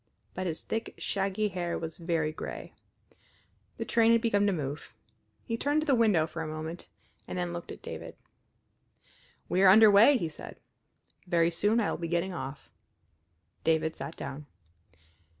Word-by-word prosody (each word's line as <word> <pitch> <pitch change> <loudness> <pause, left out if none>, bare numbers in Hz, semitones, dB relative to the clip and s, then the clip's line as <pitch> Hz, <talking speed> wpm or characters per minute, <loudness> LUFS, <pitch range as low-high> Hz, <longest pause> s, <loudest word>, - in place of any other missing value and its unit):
But 185 0 -3
his 160 -2 -4
thick, 225 +1 -4
shaggy 200 +2 -1
hair 175 -2 -3
was 165 0 -6
very 165 -2 0
gray. 155 - -7 1.0
The - - -3
train 230 -1 +4
had 230 - +4
begun 205 -3 +2
to - - +3
move. 150 -4 -5 0.5
He 230 -2 -3
turned 290 +5 +1
to - - -3
the 285 - +3
window 215 -10 +4
for 160 0 -6
a 160 - -3
moment, 155 +2 -6 0.4
and - - -5
then 175 -1 -2
looked 175 0 -6
at - - -10
David. - - -7 1.3
"We 185 - +1
are 195 - +8
under 215 +2 +8
way," 225 +8 +7
he 170 - -2
said. 155 - -10 0.7
"Very 170 -1 +3
soon 205 +7 +2
I 220 - +1
will - - -4
be 170 - -3
getting 175 +3 -1
off." 135 -3 -7 0.9
David 160 0 +1
sat 135 - -7
down. 140 +1 -7
175 Hz, 170 wpm, -29 LUFS, 160-210 Hz, 1.3 s, are